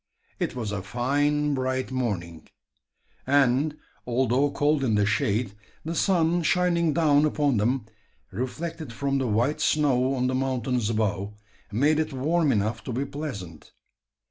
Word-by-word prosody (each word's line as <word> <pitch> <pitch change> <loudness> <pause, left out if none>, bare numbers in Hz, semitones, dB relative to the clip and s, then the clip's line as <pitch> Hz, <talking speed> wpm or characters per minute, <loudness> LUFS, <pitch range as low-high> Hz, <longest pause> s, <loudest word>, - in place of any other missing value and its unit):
It - - -2
was 115 -4 -3
a 100 -2 -3
fine 145 +7 0
bright 130 -1 -2
morning; 90 -11 -3 0.8
and, 140 +2 +3 0.3
although 130 +3 +2
cold 145 0 +1
in 115 -5 +2
the 105 -1 +3
shade, 110 0 0 0.3
the 165 - -2
sun 175 -1 +2
shining 170 -1 +2
down 150 -2 +3
upon 145 -4 +1
them, 120 +3 0 0.5
reflected 155 - -5
from 140 +3 -1
the 130 - -1
white 120 +7 +1
snow 135 -3 +2
on 125 -1 0
the 130 - 0
mountains 130 -3 -1
above, 105 -2 -1 0.4
made 145 +8 +2
it 155 -2 -1
warm 150 +3 +1
enough 110 0 -1
to - - -4
be 130 +4 -1
pleasant. 120 - -7
130 Hz, 145 wpm, -26 LUFS, 115-150 Hz, 0.8 s, and